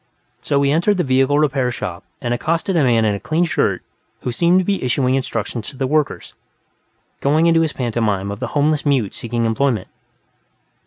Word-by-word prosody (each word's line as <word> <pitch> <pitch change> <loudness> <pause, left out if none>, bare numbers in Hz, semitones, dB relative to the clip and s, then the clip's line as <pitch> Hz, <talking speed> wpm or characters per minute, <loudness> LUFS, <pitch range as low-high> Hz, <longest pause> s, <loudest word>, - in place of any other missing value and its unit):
So 140 - 0
he 140 - +2
entered 175 +6 +2
the 180 - +1
vehicle 135 +1 +2
repair 135 -4 +1
shop 90 -6 -5 0.2
and 120 -3 -1
accosted 165 +9 -1
a 160 - +3
man 115 -3 +3
in 105 - +2
a 100 - -4
clean 160 - 0
shirt 160 - 0 0.4
who 125 - -3
seemed 170 +8 +3
to 185 - -1
be 200 0 -1
issuing 125 +1 +1
instructions 115 -3 -3
to 135 - -13
the 135 - -1
workers, 150 +1 -1 0.9
going 155 +4 +2
into 165 -1 +4
his 160 -2 0
pantomime 110 -5 -1
of 100 - -6
the - - -3
homeless 150 0 +2
mute 135 -9 +1
seeking 115 0 -2
employment. 115 -2 0
135 Hz, 190 wpm, -19 LUFS, 115-155 Hz, 0.9 s, into